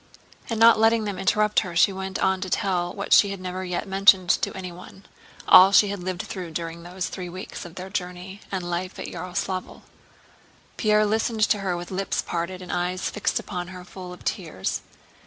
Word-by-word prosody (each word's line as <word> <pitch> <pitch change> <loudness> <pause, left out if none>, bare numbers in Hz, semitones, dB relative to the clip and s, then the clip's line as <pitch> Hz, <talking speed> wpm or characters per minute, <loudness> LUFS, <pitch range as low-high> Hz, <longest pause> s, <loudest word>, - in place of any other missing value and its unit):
And 225 -2 -2
not 230 -1 +7
letting 225 0 +4
them 200 -3 -4
interrupt 210 +2 +3
her 180 -4 -5
she 195 +3 +4
went 190 0 -4
on 190 0 +1
to 190 - -4
tell 175 -2 0
what 200 +1 -1
she 205 - +7
had 195 -1 -5
never 185 0 -5
yet 180 +2 -3
mentioned 195 -1 +5
to - - 0
anyone—all 185 +1 +2
she 205 0 +6
had 200 -1 -4
lived 185 0 -3
through 180 -3 -6
during 165 0 -5
those 180 +2 -4
three 180 -2 -6
weeks 185 +1 -8
of 170 0 -11
their 185 +1 -7
journey 180 +1 -5
and 185 -3 -3
life 175 +2 -3
at - - -5
Yaroslávl. 185 0 -4 0.9
Pierre 215 -1 +3
listened 220 +1 0
to 210 - +2
her 185 -3 -1
with 175 +1 -7
lips 195 +1 -1
parted 180 +2 -4
and 180 - -7
eyes 180 +1 -1
fixed 210 - -1
upon 180 -3 -4
her 180 0 -9
full 180 -1 -10
of 180 - -12
tears. 160 - -3
185 Hz, 195 wpm, -24 LUFS, 180-195 Hz, 0.9 s, not